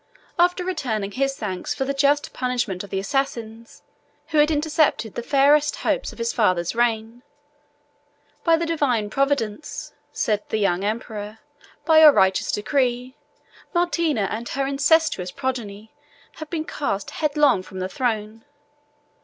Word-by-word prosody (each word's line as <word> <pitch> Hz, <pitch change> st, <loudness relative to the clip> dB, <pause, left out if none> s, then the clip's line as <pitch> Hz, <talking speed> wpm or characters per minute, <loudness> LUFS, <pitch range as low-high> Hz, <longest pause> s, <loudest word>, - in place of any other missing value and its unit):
After 360 Hz, +1 st, +3 dB
returning 235 Hz, -, -2 dB
his 270 Hz, +3 st, -1 dB
thanks 190 Hz, -4 st, -4 dB
for 265 Hz, -, -2 dB
the 275 Hz, -, -1 dB
just 285 Hz, +1 st, +1 dB
punishment 240 Hz, -7 st, -2 dB
of 200 Hz, -, -10 dB
the 195 Hz, -, -3 dB
assassins, 230 Hz, 0 st, -3 dB, 0.5 s
who 310 Hz, -, +2 dB
had 300 Hz, +1 st, +5 dB
intercepted 300 Hz, -, +1 dB
the -, -, -4 dB
fairest 285 Hz, +4 st, +3 dB
hopes -, -, 0 dB
of -, -, -15 dB
his 230 Hz, 0 st, -2 dB
father's 185 Hz, -7 st, +1 dB
reign, 230 Hz, 0 st, -1 dB, 1.2 s
"By 330 Hz, -1 st, +4 dB
the 335 Hz, -, -1 dB
divine 255 Hz, -10 st, 0 dB
Providence," 275 Hz, -2 st, -2 dB, 0.2 s
said 210 Hz, -1 st, 0 dB
the -, -, 0 dB
young 195 Hz, -3 st, +1 dB
emperor, 215 Hz, 0 st, -4 dB, 0.3 s
"and -, -, -30 dB
by 320 Hz, -1 st, +6 dB
your 310 Hz, -1 st, +10 dB
righteous 190 Hz, -3 st, +2 dB
decree, 250 Hz, +3 st, -1 dB, 0.6 s
Martina 335 Hz, -, +1 dB
and 230 Hz, +2 st, -4 dB
her 275 Hz, 0 st, -1 dB
incestuous 280 Hz, -, +2 dB
progeny 220 Hz, -3 st, -5 dB, 0.5 s
have 315 Hz, -1 st, -8 dB
been 320 Hz, -2 st, -3 dB
cast 205 Hz, -12 st, -3 dB
headlong 295 Hz, -, +2 dB
from 185 Hz, 0 st, -11 dB
the 185 Hz, 0 st, -2 dB
throne. 225 Hz, -2 st, -3 dB
245 Hz, 145 wpm, -23 LUFS, 215-295 Hz, 1.2 s, your